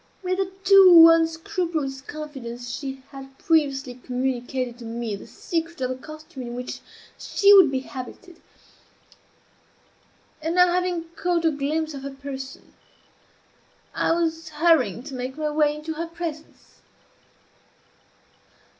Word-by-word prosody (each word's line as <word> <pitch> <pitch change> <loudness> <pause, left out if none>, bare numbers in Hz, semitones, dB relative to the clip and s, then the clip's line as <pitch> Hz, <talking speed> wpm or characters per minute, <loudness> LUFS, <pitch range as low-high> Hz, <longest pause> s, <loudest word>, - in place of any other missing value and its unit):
With 370 +1 -1
a 380 -1 -1
too 370 -4 +9
unscrupulous 325 -3 -1
confidence 265 -5 -7
she 270 -1 -6
had 270 -1 -11
previously 285 -8 +1
communicated 250 0 -3
to 235 - -9
me 230 -2 -4
the 195 - -11
secret 335 -1 -4
of 255 -1 -1
the - - -3
costume 310 0 -11
in 240 -1 -6
which 250 0 -6 0.4
she 405 0 +4
would 380 -6 +8
be 265 -1 -2
habited, 265 +7 -10 2.0
and 325 +2 -2
now, 360 0 +6
having 360 -2 0
caught 345 -1 0
a 325 - +4
glimpse 310 +2 -2
of 275 - -7
her 275 - -5
person, 270 -1 -9 1.2
I - - +1
was 325 -1 -1
hurrying 300 - +2
to 280 0 -9
make 255 +2 -5
my 305 -1 -1
way 295 -1 +2
into 305 +1 -5
her 330 +2 -4
presence. 330 -2 -8
300 Hz, 130 wpm, -24 LUFS, 265-330 Hz, 2.0 s, too